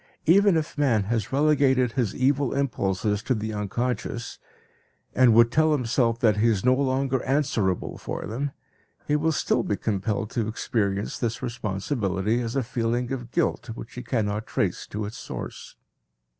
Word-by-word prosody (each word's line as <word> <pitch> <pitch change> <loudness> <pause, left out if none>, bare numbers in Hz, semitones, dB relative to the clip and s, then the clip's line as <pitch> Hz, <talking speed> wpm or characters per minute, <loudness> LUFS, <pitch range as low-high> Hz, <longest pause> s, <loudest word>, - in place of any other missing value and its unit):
Even 195 +2 +5
if 155 -1 -3
man 120 -8 +3
has 115 +5 -2
relegated 135 -3 +3
his 115 -5 -1
evil 135 0 +1
impulses 105 -6 0
to 130 +2 0
the 110 0 -3
unconscious, 115 +3 -3 0.7
and 120 -3 +5
would 115 0 +6
tell 155 +2 +3
himself 120 -3 +1
that 110 -3 +3
he 110 +3 +3
is 110 -3 +1
no 130 - +6
longer 130 -1 0
answerable 120 -10 0
for - - -5
them, 135 +7 -2 0.6
he 150 - +2
will 160 +2 +2
still 140 -5 +1
be 105 - -1
compelled 105 +2 -2
to 115 -4 -1
experience 100 -2 -1
this 115 +1 -2
responsibility 105 -1 -1
as 115 +1 -4
a 135 - +1
feeling 120 +1 -1
of 120 -3 -4
guilt 165 -3 0
which 115 - -9
he 125 - -6
cannot 110 -3 -2
trace - - -1
to 105 0 -4
its 105 - -7
source. - - -7
120 Hz, 160 wpm, -25 LUFS, 110-135 Hz, 0.7 s, would